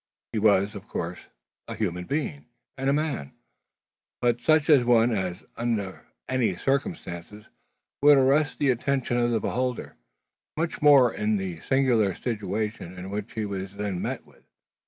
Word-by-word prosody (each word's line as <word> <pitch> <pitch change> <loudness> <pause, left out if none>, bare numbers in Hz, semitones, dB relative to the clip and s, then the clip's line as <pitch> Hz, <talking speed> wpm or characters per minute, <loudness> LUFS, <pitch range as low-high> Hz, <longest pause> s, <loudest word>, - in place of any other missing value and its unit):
He 110 - 0
was, 100 -1 +3
of 100 +1 -9
course, 85 +2 -4 0.5
a - - -5
human 90 -4 -2
being, 90 - -3 0.3
and 135 +1 -1
a - - +3
man; 150 - -2 0.9
but 120 -1 +1
such 155 +1 +3
an 140 -7 +5
one 120 0 +5
as, 95 -3 -2
under 110 -5 -3 0.2
any 130 -7 +1
circumstances, 105 - -3 0.6
would 145 0 +7
arrest 140 +3 +3
the 140 -2 +3
attention 130 0 0
of 120 0 +2
the 115 -1 +1
beholder; 125 - -3 0.6
much 165 +1 -2
more 140 -5 +6
in 105 0 0
the 95 -4 -4
singular 120 - +2
situation 105 -4 -3
in 95 +2 -7
which 105 0 -5
he 110 -1 -2
was 100 -1 -5
then 100 -3 -3
met - - -4
with. - - -23
115 Hz, 155 wpm, -26 LUFS, 100-130 Hz, 0.9 s, would